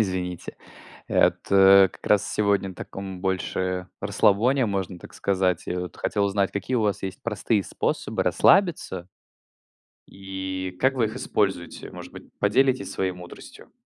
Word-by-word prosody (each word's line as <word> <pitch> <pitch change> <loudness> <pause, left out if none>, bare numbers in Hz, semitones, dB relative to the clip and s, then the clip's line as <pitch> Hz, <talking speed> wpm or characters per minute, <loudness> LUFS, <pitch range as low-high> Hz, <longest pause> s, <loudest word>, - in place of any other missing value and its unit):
Извините. 90 -4 -3 0.5
Вот, - - +4 0.2
э, 95 0 +7
как - - -15
раз 105 0 +2
сегодня 100 -2 +1
на - - -11
таком 95 0 -8
больше 95 -1 -2
расслабоне, 120 +6 +2
можно 95 -3 -3
так - - -13
сказать. 95 -3 0
Я 90 - -2
вот 90 -3 -7
хотел 100 - 0
узнать, 100 -1 0
какие 100 +6 -3
у 115 - +1
вас 105 -2 -1
есть 95 0 -6
простые 105 -1 0
способы - - -2
расслабиться 165 - +2 1.0
и 95 -1 -6
как 130 +1 +3
вы 125 - +1
их 110 - -3
используете? 95 -4 -2
Может - - -10
быть, - - -11 0.2
поделитесь 130 +6 +2
своей 95 -1 -1
мудростью? 90 -1 -13
95 Hz, 145 wpm, -25 LUFS, 95-105 Hz, 1.0 s, э